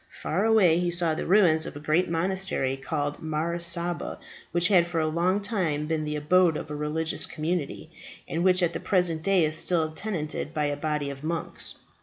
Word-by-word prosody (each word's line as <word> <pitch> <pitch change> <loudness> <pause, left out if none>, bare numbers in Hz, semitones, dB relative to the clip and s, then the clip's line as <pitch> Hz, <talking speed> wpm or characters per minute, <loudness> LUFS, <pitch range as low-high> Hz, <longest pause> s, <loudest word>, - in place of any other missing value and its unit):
Far 190 +7 -1
away 195 -7 +4
he 175 0 0
saw 170 -2 0
the - - -4
ruins 170 -5 +4
of - - -8
a - - -6
great 155 +5 +1
monastery, 170 -5 0
called 145 +1 -3
Mar 160 +2 -2
Saba, 170 0 -1 0.3
which 175 0 +2
had 175 -4 +5
for 170 -1 -2
a 155 - +1
long 175 +5 +1
time 180 -8 -1
been 155 0 -2
the 150 0 -3
abode 165 +2 +3
of - - -7
a - - -3
religious 155 +2 -1
community, 155 -1 -3 0.4
and 170 - -2
which 185 0 +4
at 170 -1 +1
the - - -3
present 175 -4 +1
day 190 -1 +3
is 155 0 0
still 160 -1 +1
tenanted 160 -4 -4
by 150 -1 +1
a 145 0 -1
body 150 -1 -2
of 140 +1 -10
monks. 165 +1 -4
165 Hz, 200 wpm, -26 LUFS, 155-180 Hz, 0.4 s, had